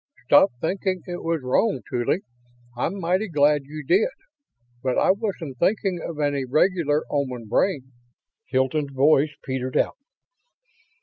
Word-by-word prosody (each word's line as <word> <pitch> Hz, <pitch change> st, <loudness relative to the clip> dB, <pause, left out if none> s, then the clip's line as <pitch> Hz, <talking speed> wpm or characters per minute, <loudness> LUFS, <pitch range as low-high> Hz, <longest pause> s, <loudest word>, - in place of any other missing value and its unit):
"Stop -, -, +6 dB
thinking 185 Hz, +3 st, -2 dB
it 175 Hz, -1 st, -5 dB
was 165 Hz, -2 st, -1 dB
wrong, 130 Hz, -, +1 dB
Tuly. 125 Hz, +8 st, 0 dB, 0.5 s
I'm 170 Hz, +11 st, -2 dB
mighty 185 Hz, +5 st, 0 dB
glad 145 Hz, -3 st, +2 dB
you 150 Hz, +2 st, -8 dB
did. 410 Hz, +6 st, +4 dB, 0.7 s
But 130 Hz, 0 st, -1 dB
I -, -, +4 dB
wasn't 185 Hz, -, -4 dB
thinking 190 Hz, -1 st, +1 dB
of 160 Hz, -3 st, -6 dB
any 145 Hz, -2 st, 0 dB
regular 155 Hz, +2 st, +2 dB
Oman 130 Hz, -5 st, -2 dB
brain...." 130 Hz, -, 0 dB, 0.6 s
Hilton's 135 Hz, +2 st, 0 dB
voice 145 Hz, +2 st, +3 dB
petered 130 Hz, -1 st, -2 dB
out. -, -, +1 dB
150 Hz, 130 wpm, -24 LUFS, 130-185 Hz, 0.7 s, Stop